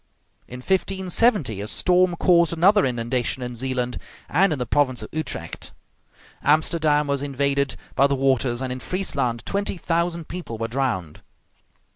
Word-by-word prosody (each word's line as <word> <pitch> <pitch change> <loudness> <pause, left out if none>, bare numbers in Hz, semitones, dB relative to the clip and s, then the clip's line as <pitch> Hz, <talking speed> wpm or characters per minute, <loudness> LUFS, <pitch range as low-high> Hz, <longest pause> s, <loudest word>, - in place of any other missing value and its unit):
In 125 +1 -9
1570 190 - +1
a 105 - -5
storm 180 +6 +3
caused 170 -1 +3
another 195 +2 +4
inundation 125 +1 -2
in 125 0 -5
Zealand 125 0 -2 0.3
and 185 +4 +3
in 150 - 0
the 125 - -2
province 130 0 +1
of - - -8
Utrecht; 155 0 -5 0.7
Amsterdam 155 0 +2
was 140 -1 -1
invaded 140 0 0 0.2
by 135 +1 +4
the 140 - 0
waters, 130 -2 +1
and 130 - -3
in 130 - -6
Friesland 135 -10 -2
twenty 200 -1 -1
thousand 170 -1 -1
people 170 -10 -6
were 115 +1 -2
drowned. 115 - -2
140 Hz, 145 wpm, -23 LUFS, 125-170 Hz, 0.7 s, another